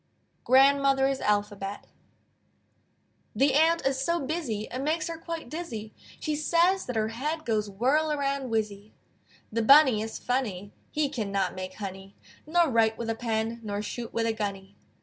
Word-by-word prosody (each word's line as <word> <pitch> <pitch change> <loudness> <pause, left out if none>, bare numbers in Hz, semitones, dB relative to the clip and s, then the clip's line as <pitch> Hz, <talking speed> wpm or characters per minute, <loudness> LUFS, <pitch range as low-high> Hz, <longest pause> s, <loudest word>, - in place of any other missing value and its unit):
GRANDMOTHER'S 270 0 +4
ALPHABET 205 -1 -1 1.5
The 270 +5 +3
Ant 325 +3 +3
is 270 -1 +1
so 340 +5 +1
busy 275 -7 -3
It 255 - -4
makes 310 +4 0
her 330 -1 -5
quite 330 -4 -6
dizzy, 235 -9 -6 0.3
She 305 - -2
says 340 +5 +2
that 250 - -4
her 220 0 +1
head 300 +7 -3
Goes 215 -2 0
whirl 270 +10 +1
around 275 -2 -1
whizzy. 215 -2 -3 0.6
The 230 +1 0
Bunny 265 -2 +6
is 220 0 -5
funny; 210 -6 -2 0.2
He 300 -1 0
cannot 200 -8 -2
make 185 0 -6
honey, 195 -1 -8 0.3
Nor 340 0 +3
write 225 -1 +3
with 230 -1 -2
a - - -2
pen, 225 0 -2
Nor 205 -1 -4
shoot 235 +2 -5
with 230 0 -1
a 225 - +1
gunny. 200 -2 -5
235 Hz, 155 wpm, -27 LUFS, 210-295 Hz, 1.5 s, Bunny